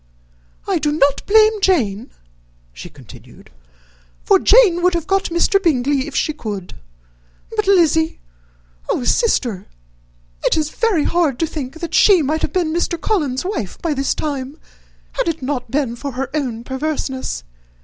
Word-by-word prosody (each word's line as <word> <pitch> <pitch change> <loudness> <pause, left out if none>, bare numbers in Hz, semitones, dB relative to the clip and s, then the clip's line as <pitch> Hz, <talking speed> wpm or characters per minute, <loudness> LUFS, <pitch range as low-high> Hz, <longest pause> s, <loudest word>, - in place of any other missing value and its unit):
"I - - +1
do 295 - 0
not 285 -2 +1
blame 435 0 +4
Jane," 245 - +1 0.6
she - - -10
continued, - - -16 0.7
"for - - +4
Jane 405 -7 +5
would 360 0 +2
have 335 -2 -2
got 390 +2 +1
Mr. 345 +3 +2
Bingley 280 -4 +1
if 300 - -8
she 310 - 0
could. 205 -10 -6 0.8
But, 425 -2 -1
Lizzy! 325 -4 +3 0.7
Oh, - - 0
sister! 240 - 0 0.8
it - - +2
is 310 -1 -1
very 420 -10 +1
hard 330 -7 +1
to 330 - 0
think 305 0 -7
that 340 - -5
she 380 -6 +5
might 310 +3 -1
have - - -2
been 345 -4 0
Mr. 340 0 -1
Collins's 300 - -1
wife 345 - -4
by 330 -3 -1
this 275 -1 -1
time, 280 -1 -4 0.5
had 335 -10 -2
not 260 -1 -2
it 225 - -21
been 265 -4 -1
for 275 +2 -6
her 260 +1 -4
own 250 -7 -3
perverseness. 265 0 -4
305 Hz, 155 wpm, -18 LUFS, 260-350 Hz, 0.8 s, Jane